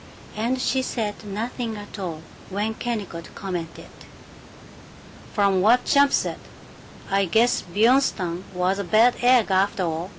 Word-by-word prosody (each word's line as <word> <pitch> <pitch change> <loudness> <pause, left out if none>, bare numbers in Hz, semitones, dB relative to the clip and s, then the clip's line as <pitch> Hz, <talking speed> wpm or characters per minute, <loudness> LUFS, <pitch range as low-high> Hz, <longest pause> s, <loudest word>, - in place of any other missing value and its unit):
And 235 +4 -1
she 260 +1 +1
said 220 -5 -4
nothing 220 +2 -4
at 205 0 -9
all 165 -4 -5 0.3
when 205 +3 -2
Kennicott 210 -8 -5
commented, 175 -4 -6 1.4
"From 200 -3 +2
what 235 +5 +4
Champ 280 -1 +4
says, - - 0 0.7
I 195 0 +2
guess 225 +7 +2
Bjornstam 195 -4 +1
was 185 +1 0
a - - -1
bad 220 +7 +4
egg, 245 -4 +4
after 195 +1 +1
all. 165 +1 -3
205 Hz, 130 wpm, -23 LUFS, 185-235 Hz, 1.4 s, what